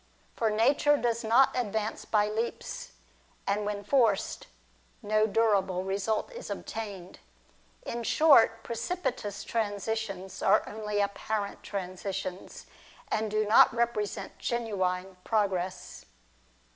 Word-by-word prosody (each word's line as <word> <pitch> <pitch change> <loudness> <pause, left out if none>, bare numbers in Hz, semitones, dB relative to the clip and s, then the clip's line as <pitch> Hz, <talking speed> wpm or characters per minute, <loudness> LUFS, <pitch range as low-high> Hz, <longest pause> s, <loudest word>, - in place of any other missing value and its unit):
For 225 - +1
nature 275 +7 +3
does 235 -3 -1
not 235 +5 +4
advance 220 -3 -2
by 210 -1 +2
leaps; 230 - -4 0.5
and 205 +1 0
when 205 -1 -3
forced, 225 -3 +1 0.6
no 215 +1 +2
durable 200 -4 +2
result 200 - -1
is - - -8
obtained. 200 -5 -6 0.6
In 235 - -4
short, 230 -4 +5
precipitous 240 - -3
transitions 205 -3 -3
are 205 +2 +4
only 210 -1 -2
apparent 200 +1 -2
transitions, 190 -1 -5 0.5
and 220 0 0
do 215 +1 +1
not 210 - +7
represent 235 -3 -2
genuine 190 -5 -2
progress. 190 -4 -1
215 Hz, 105 wpm, -29 LUFS, 200-230 Hz, 0.6 s, not